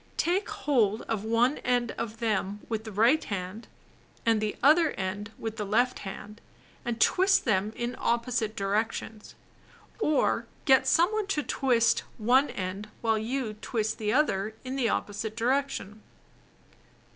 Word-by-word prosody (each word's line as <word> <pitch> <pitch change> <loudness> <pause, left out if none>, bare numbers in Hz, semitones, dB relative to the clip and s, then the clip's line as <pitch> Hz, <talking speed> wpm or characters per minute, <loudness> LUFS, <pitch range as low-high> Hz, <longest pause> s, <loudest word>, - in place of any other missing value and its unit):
Take 380 +6 +1
hold 255 - +1
of 220 -3 -3
one 230 +5 +2
end 245 -1 0
of 230 -1 -5
them 210 -3 -1
with 220 -1 -3
the 220 - -6
right 230 +10 +3
hand, 195 +2 -5 0.6
and 225 -2 +3
the 215 -1 -1
other 310 +3 +5
end 195 +2 -4
with 225 -1 -5
the 210 - -2
left 240 +5 +1
hand, 205 +2 -8 0.4
and 235 -1 -3
twist 375 - +4
them 210 -2 +1
in 240 +1 -3
opposite 235 -2 0
directions. 210 +2 -2 0.6
Or 310 -9 +1 0.2
get 265 -2 +5
some 345 +4 +4
one 430 -1 -1
else 400 - -1
to 300 - -1
twist 235 -5 +2 0.2
one 250 +6 +3
end 190 +2 -5
while 225 -1 +2
you 235 0 -2
twist 220 -2 -2
the 210 -1 0
other 220 -6 +1
in 260 +1 -4
the 250 -4 +1
opposite 210 +1 -3
direction. 245 -4 -1
230 Hz, 150 wpm, -28 LUFS, 210-260 Hz, 0.6 s, other